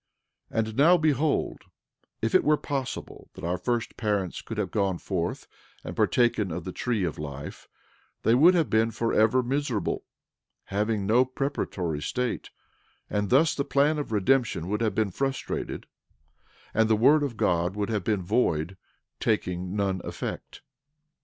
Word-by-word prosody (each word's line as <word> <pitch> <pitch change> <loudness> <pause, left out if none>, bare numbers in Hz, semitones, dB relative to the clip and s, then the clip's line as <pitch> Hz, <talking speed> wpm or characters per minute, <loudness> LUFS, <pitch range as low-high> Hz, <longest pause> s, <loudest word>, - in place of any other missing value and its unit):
12:26 110 -1 0
And 110 - -7
now 165 +6 +6
behold, 155 -2 +1 0.6
if 115 - 0
it 185 - +5
were 150 0 +4
possible 135 -3 -5
that - - -10
our 90 +1 -1
first 120 +4 -2
parents 100 -5 -1
could - - -7
have - - -1
gone 95 -3 0
forth 90 -1 -3 0.4
and - - -6
partaken 120 -5 +2
of 85 +1 -4
the 95 - -5
tree 115 0 -1
of 85 -4 -3
life 70 -1 -7 0.6
they 115 - +4
would 165 +9 +6
have 165 -3 +2
been 110 +1 +2
forever 115 +2 +2
miserable, 130 -4 -1 0.6
having 105 0 -1
no 115 +5 +5
preparatory 125 - -3
state; 125 +7 -2 0.6
and 105 -1 0
thus 150 +5 +4
the 140 - -1
plan 145 +3 +2
of 145 - -4
redemption 110 -4 +1
would 105 +2 -1
have 110 -4 0
been 110 -3 +1
frustrated, 135 +6 -3 0.9
and 110 0 +3
the 110 - +5
word 140 +8 +5
of 135 -6 -3
God 90 0 +1
would 105 0 -2
have 105 -2 -1
been 105 -5 0
void, 90 -4 0 0.4
taking 90 +1 -1
none 95 -3 0
effect. - - -6
110 Hz, 155 wpm, -27 LUFS, 95-130 Hz, 0.9 s, now